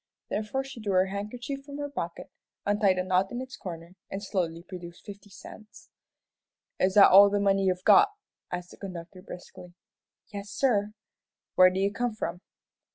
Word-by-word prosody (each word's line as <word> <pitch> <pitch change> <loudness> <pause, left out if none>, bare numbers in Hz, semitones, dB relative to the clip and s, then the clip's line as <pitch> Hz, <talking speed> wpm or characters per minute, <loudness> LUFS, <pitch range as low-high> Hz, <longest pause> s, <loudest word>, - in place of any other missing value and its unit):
Therefore 220 +6 -2
she 270 -3 -10
drew 205 -3 -2
her 185 0 +4
handkerchief 235 +8 -5
from 280 0 -9
her 290 0 -3
pocket, 170 -12 -6 0.3
untied 205 -2 +3
a 185 - 0
knot 185 +1 +1
in 245 - -4
its 260 0 -7
corner, 170 -1 -8 0.2
and 195 +1 -5
slowly 170 -4 -2
produced 175 -2 -10
fifty 205 -1 -11
cents. 215 +2 -14 0.9
"Is 185 +1 +2
that 205 - +8
all 200 +2 +9
the 205 0 0
money 195 -1 +2
you've 185 -1 0
got?" 405 - +7 0.4
asked 180 0 -5
the - - -14
conductor, 180 -1 -8
briskly. 180 -1 -11 0.6
"Yes, 200 0 -6
sir." 210 -3 +1 0.6
"Where 185 0 +7
do 185 +1 -3
you 200 +1 +1
come 240 -1 -2
from?" 175 -4 -4
195 Hz, 170 wpm, -28 LUFS, 185-215 Hz, 0.9 s, all